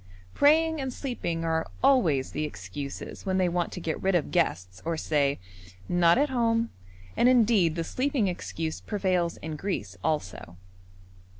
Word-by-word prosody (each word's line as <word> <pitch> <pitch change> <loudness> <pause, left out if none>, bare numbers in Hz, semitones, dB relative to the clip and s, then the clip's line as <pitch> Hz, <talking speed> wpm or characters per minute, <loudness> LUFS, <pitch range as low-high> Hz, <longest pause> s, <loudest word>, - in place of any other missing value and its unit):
Praying 320 +1 +4
and 265 -1 -3
sleeping 175 - -3
are 160 0 0 0.2
always 200 - +3
the 155 - -2
excuses 110 +4 -6
when 190 -1 0
they 185 -1 +3
want 175 -1 -1
to - - -6
get 165 -2 -3
rid 190 -1 +2
of 170 - 0
guests 95 - 0
or 165 0 -2
say 145 -3 +1 0.5
'not 175 0 +4
at 290 +1 +2
home,' 230 -2 +1 0.4
and 245 - +4
indeed 220 -9 +4
the 165 - -1
sleeping 255 - 0
excuse 165 -3 -4
prevails 185 -5 0
in 160 0 -4
Greece 145 - -4
also. 95 - -3
175 Hz, 155 wpm, -27 LUFS, 155-230 Hz, 0.5 s, Praying